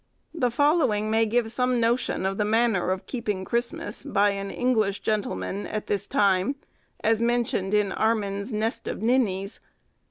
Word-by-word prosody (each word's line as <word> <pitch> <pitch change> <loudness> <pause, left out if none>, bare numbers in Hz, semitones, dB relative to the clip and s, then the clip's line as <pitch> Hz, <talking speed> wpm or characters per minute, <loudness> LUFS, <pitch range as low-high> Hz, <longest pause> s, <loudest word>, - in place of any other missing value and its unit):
The 255 -7 +1
following 245 -6 +2
may 225 0 +3
give 225 0 0
some 250 +1 +1
notion 235 -4 +1
of 195 +1 -1
the - - +3
manner 220 -3 +2
of 185 0 -2
keeping 210 -7 -3
Christmas, 245 - -3
by 205 -7 +2
an 200 0 -4
English 220 -5 0
gentleman, 200 - -2
at 215 -1 -4
this 200 -1 -2
time, 200 0 +2 0.5
as 225 0 +2
mentioned 235 -4 +1
in 205 -2 +2
Armin's 205 0 -1
'Nest 220 +2 -2
of - - -4
Ninnies. 215 -5 0
220 Hz, 155 wpm, -25 LUFS, 200-240 Hz, 0.5 s, may